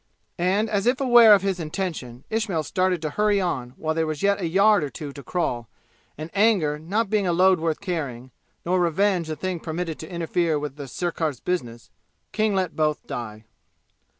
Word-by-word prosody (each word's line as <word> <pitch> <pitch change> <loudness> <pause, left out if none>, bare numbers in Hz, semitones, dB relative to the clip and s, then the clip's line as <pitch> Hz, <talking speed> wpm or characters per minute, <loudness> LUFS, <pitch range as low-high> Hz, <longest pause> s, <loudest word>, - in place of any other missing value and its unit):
And 190 +5 +2
as 205 0 -1
if 255 +1 +2
aware 240 -5 +8
of 195 - -1
his 195 -2 -1
intention 155 -7 -5
Ismail 215 -8 -1
started 185 +1 0
to 155 - -2
hurry 210 +3 +2
on 130 -9 -3
while 160 0 -1
there 160 0 0
was 155 +3 -4
yet 200 0 +2
a 170 - 0
yard 200 +2 +4
or 145 - -3
two 145 -1 -7
to 140 - -9
crawl, 125 -9 -2 0.5
and 155 +2 -7
anger 195 -8 +2
not 200 +8 -1
being 205 -3 +1
a - - +2
load 185 +1 +4
worth 160 +1 -1
carrying, 140 -10 -4 0.3
nor 180 +2 +1
revenge 175 0 +1
a 155 - -2
thing 180 +3 -3
permitted 165 0 -4
to 160 - -9
interfere 170 -1 0
with 145 -2 -5
the 145 -2 -8
sirkar's 160 -2 -2
business, 120 -10 -4 0.4
King 215 -1 +1
let 185 -3 -1
both 155 -1 0
die. 110 -5 -6
170 Hz, 190 wpm, -24 LUFS, 150-195 Hz, 0.5 s, aware